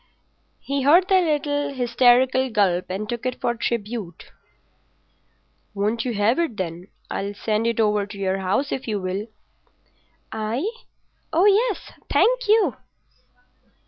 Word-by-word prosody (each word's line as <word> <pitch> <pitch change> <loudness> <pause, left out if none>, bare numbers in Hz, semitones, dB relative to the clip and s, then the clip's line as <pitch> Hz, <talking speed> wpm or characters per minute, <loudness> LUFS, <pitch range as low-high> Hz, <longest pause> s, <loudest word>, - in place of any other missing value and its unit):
He 280 0 -2
heard 335 +7 +5
the 380 -1 +5
little 290 -3 0
hysterical 250 +1 +3
gulp 190 -5 +1
and 195 +3 -4
took 235 +1 -4
it 255 -1 -3
for 240 - 0
tribute. 225 -6 -4 1.4
"Won't 215 +4 -1
you 240 -3 -2
have 210 +8 +2
it, 320 -11 -1
then? 175 0 -5 0.2
I'll 200 +1 -3
send 215 +2 -1
it 230 -1 -1
over 210 -2 +2
to 205 0 -10
your 195 -1 -1
house 200 +10 -1
if 265 - -4
you 210 -2 -1
will." 190 +3 -3 1.0
"I? 225 - -2 0.6
Oh 345 +5 +3
yes—thank 465 +3 +1
you. 435 +1 +3
235 Hz, 130 wpm, -23 LUFS, 205-280 Hz, 1.4 s, heard